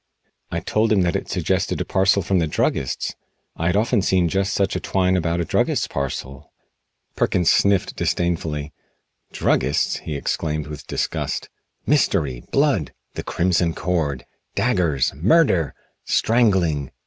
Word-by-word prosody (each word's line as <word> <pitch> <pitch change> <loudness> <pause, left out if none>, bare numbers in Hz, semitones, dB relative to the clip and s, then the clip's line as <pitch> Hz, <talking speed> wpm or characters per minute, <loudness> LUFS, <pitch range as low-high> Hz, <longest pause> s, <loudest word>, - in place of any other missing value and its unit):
I - - -3
told 110 0 +1
him 100 -3 +4
that 85 -2 0
it - - -3
suggested - - 0
a - - -2
parcel 95 +1 +2
from 95 +2 +1
the 80 - +1
druggist's. 65 -3 -1 0.4
I 85 - -1
had 90 - +1
often 110 +1 +2
seen 90 -2 +2
just 95 +3 0
such 100 -2 0
twine 95 -1 +1
about 85 -1 0
a 85 - 0
druggist's - - +1
parcel. 70 +1 -5 0.6
Perkins 90 -2 +2
sniffed 100 -2 +2
disdainfully. 80 -4 -1 0.6
"Druggists?" 70 +3 +1
he 75 - -6
exclaimed 75 +1 -2
with 75 -1 -9
disgust. - - -2 0.4
"Mystery! 80 - +1
Blood! - - +1 0.2
'The - - -4
Crimson 85 -1 +1
Cord.' 80 -7 -1 0.3
Daggers! 90 - +1
Murder! 90 - +3 0.3
Strangling! 95 - +2
85 Hz, 135 wpm, -22 LUFS, 75-95 Hz, 0.6 s, him